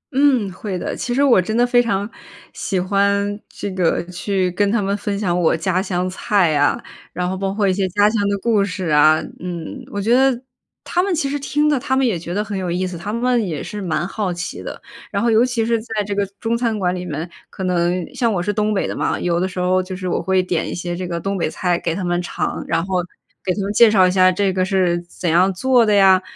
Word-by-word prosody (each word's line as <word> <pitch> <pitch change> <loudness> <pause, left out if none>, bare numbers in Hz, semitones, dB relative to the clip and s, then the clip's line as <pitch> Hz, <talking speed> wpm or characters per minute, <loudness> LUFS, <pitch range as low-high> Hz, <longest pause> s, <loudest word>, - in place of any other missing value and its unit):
嗯， 265 -8 +3
会 190 0 -4
的， - - -4
其 240 - -4
实 275 +3 +2
我 245 -9 +5
真 215 +5 -2
的 245 - +4
非 245 0 +4
常 205 -3 -1 0.5
喜 190 - -2
欢 200 +2 +1
这 200 - -6
个 180 -3 +1
去 185 0 -1
跟 200 +3 +1
他 235 - +2
们 200 0 0
分 205 0 -3
享 180 -4 0
我 165 - +3
家 185 +2 0
乡 180 -2 -1
菜 190 -2 +1
呀， 145 -1 +2 0.3
然 180 +1 -2
后 185 - -2
包 195 0 -2
括 200 0 0
一 190 - +3
些 190 0 0
家 205 +3 +3
乡 225 -3 0
的 200 - 0
故 215 0 +2
事 185 -3 -3
啊， 155 +1 +6 0.2
嗯。 175 -2 -5 0.2
我 200 - -3
觉 220 +4 +2
得 265 -1 +3 0.4
他 355 - 0
们 385 0 0
其 300 -3 0
实 285 +1 -2
听 295 +2 0
的， 295 -3 +2
他 260 +2 -1
们 270 - +3
也 220 -7 +1
觉 170 +1 -7
得 205 +3 0
很 210 -1 -5
有 185 -2 -3
意 180 +2 -1
思， 180 -1 -5
他 195 +5 -5
们 240 0 +1
也 155 -4 -4
是 210 -1 -6
蛮 175 0 -1
好 195 -2 -2
奇 175 +1 -5
的。 - - -7 0.3
然 200 - -1
后 235 - +3
尤 225 +2 +5
其 240 -3 0
是 230 -1 +1
在 220 -2 -3
这 205 - -3
个 200 0 +1 0.2
中 230 0 0
餐 235 -2 0
馆 180 -3 0
里 180 0 -5
面， 155 +2 -4 0.2
可 190 - -7
能 175 -1 0
像 235 -3 +1
我 190 - 0
是 205 - -1
东 210 +1 0
北 200 - 0
的 - - -4
嘛， - - -1
有 170 -1 0
的 185 - 0
时 180 -1 -6
候 185 +1 +2
就 185 0 -6
是 185 0 -5
我 - - 0
会 190 -1 +1
点 175 -3 -1
一 - - -4
些 175 0 -4
这 180 0 -4
个 170 -1 -3
东 195 +3 -2
北 160 - 0
菜 175 0 -1
给 165 -1 -2
他 190 - -3
们 175 0 0
尝， - - -3
然 165 - 0
后 185 -2 0 0.4
给 185 - 0
他 200 - -2
们 200 +2 -2
介 230 +1 +7
绍 190 -4 +5
一 - - +1
下 185 0 +5
这 195 0 0
个 185 0 +1
是 185 -3 +1
怎 175 0 -5
样 180 +4 +3
做 245 +4 +3
的 210 - +2
呀， 190 -2 +6
195 Hz, 280 characters per minute, -20 LUFS, 180-215 Hz, 0.5 s, 介